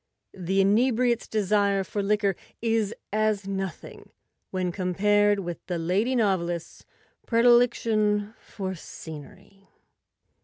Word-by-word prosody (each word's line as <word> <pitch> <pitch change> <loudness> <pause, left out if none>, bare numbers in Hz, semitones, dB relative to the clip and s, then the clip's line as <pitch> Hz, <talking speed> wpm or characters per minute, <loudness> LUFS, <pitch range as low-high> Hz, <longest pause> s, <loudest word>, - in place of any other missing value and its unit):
The 190 +1 0
inebriate's 235 +4 +2
desire 200 -2 +1
for 205 +2 -3
liquor 200 -1 +1 0.2
is 225 -3 0 0.2
as 215 -2 0
nothing 195 -4 -6 0.4
when 185 -1 -2
compared 205 +3 +2
with 175 -2 -6
the 180 -2 -2
lady 195 +10 0
novelist's 175 -7 -1 0.4
predilection 230 -3 +3
for 190 -2 -6
scenery. 160 +4 -11
200 Hz, 100 wpm, -26 LUFS, 190-215 Hz, 0.4 s, predilection